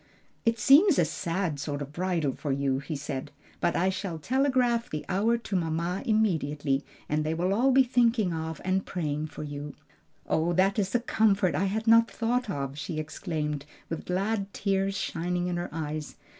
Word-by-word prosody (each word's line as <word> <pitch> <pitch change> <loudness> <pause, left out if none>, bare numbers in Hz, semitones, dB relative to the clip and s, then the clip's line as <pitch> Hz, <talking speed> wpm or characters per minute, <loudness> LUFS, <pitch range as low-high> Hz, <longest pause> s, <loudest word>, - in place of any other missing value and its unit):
"It 230 0 +3
seems 285 - +6
a 170 - +4
sad 165 -1 -2
sort 145 0 -3
of 145 0 -6
bridal 170 -5 0
for 145 - -4
you," 135 -1 +1
he 145 +3 -5
said, 135 -1 -4 0.3
"but 170 - +1
I 185 +2 +2
shall 190 -3 -4
telegraph 250 - +1
the 155 - -4
hour 220 +6 +2
to 230 -4 -5
mamma 170 +1 -1
immediately, 150 -10 +1 0.2
and 150 +1 0
they 155 +1 -1
will 180 +3 +1
all 250 +6 +3
be 265 +1 +6
thinking 235 -6 +2
of 160 0 -4
and 190 +1 +1
praying 155 -3 -2
for 155 - -8
you." 145 0 -6 0.5
"Oh, 165 +2 +1
that 195 +4 +3
is 195 +3 -1
a - - +5
comfort 205 -6 +2
I 195 - +1
had 215 +3 -1
not 230 0 +6
thought 240 0 -1
of!" 140 -4 -3
she 155 +3 -4
exclaimed, 155 -2 -3 0.2
with 165 - -4
glad 195 +2 -1
tears 195 0 0
shining 175 +1 -2
in 180 -1 -1
her 175 - -3
eyes. 155 -1 -4
180 Hz, 185 wpm, -28 LUFS, 150-215 Hz, 0.5 s, seems